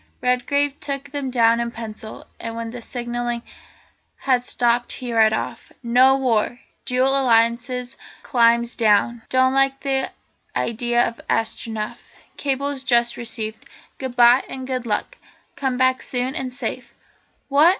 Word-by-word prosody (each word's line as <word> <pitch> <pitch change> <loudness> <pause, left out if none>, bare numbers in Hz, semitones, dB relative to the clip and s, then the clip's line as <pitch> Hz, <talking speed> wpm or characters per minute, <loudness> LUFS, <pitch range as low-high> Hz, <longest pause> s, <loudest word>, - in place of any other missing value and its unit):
Redgrave 280 +3 +1
took 275 -1 -5
them 280 -2 -3
down 235 -2 +4
in 235 0 -1
pencil, 220 -2 -8
and 230 0 -5
when 230 0 -4
the 245 0 -8
signalling 240 0 -3 0.7
had 255 -3 +1
stopped 240 -1 +1
he 245 -2 -5
read 220 -1 +5
off: 220 - -4
"No 255 +3 +5
war. 245 -2 0 0.3
Dual 255 +1 +2
Alliance 250 0 +2 0.3
climbs 235 -1 +3
down. 225 +1 +3
Don't 260 0 +3
like 270 0 +2 0.7
idea 240 +1 +1
of 230 - -7
Astronef. 220 -1 -2 0.4
Cables 280 0 -2
just 240 -2 +2
received. 220 -2 -4 0.4
Goodbye, 245 -1 +4
and 260 -1 -6
good 255 -2 -3
luck! - - -2 0.4
Come 265 -3 -1
back 260 0 +3
soon, 255 +1 -2
and 260 -2 -3
safe!" 250 -1 -6 0.5
"What? 295 +4 +6
245 Hz, 130 wpm, -22 LUFS, 235-265 Hz, 0.7 s, What